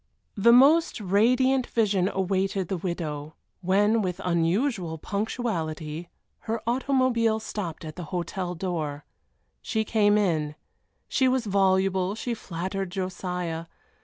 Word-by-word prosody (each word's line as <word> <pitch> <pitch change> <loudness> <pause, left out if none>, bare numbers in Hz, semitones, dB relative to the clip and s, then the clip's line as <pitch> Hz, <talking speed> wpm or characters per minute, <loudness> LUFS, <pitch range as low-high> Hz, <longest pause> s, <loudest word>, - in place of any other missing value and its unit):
The 225 +3 +5
most 285 +6 +5
radiant 245 +6 +3
vision 200 -5 +1
awaited 190 -1 -1
the 190 - -1
widow, 155 -4 -4 0.3
when, 205 +4 +3
with 180 -3 -3
unusual 175 - 0
punctuality, 170 -6 -3 0.4
her 225 +1 0
automobile 240 -3 +2
stopped 180 -7 -5
at 155 -1 -8
the 175 - -5
hotel 180 +1 -3
door. 160 -5 -3 0.6
She 220 -1 -1
came 210 -1 +3
in. 155 -7 0 0.5
She 260 - +2
was 255 -2 +1
voluble, 190 -1 +2
she 240 +2 -3
flattered 190 -1 -4
Josiah. 180 -3 -4
190 Hz, 115 wpm, -26 LUFS, 175-220 Hz, 0.6 s, The